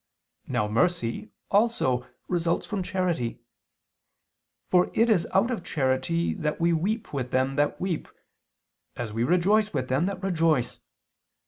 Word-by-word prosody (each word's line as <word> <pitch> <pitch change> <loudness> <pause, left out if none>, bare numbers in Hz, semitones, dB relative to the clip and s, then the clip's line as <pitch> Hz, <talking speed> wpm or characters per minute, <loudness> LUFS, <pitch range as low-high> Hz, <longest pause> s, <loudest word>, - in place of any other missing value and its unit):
Now 105 - 0
mercy, 115 -2 0 0.2
also, 200 - +2 0.2
results 170 -1 0
from 205 -2 -3
charity; 180 -11 -1 1.3
for 180 -1 +4
it 230 +1 +4
is 180 -6 +2
out 230 +6 +3
of 220 -8 -3
charity 135 +4 0
that 150 0 -2
we 170 0 +3
weep 200 +7 -1
with 130 -3 -2
them 130 +1 +1
that 145 0 +1
weep, 180 -4 -2 0.9
as 115 -3 -5
we 115 +2 0
rejoice 190 - +2
with 130 -2 -2
them 135 +8 +2
that 195 -1 -5
rejoice. 165 -9 +1
165 Hz, 135 wpm, -26 LUFS, 130-190 Hz, 1.3 s, for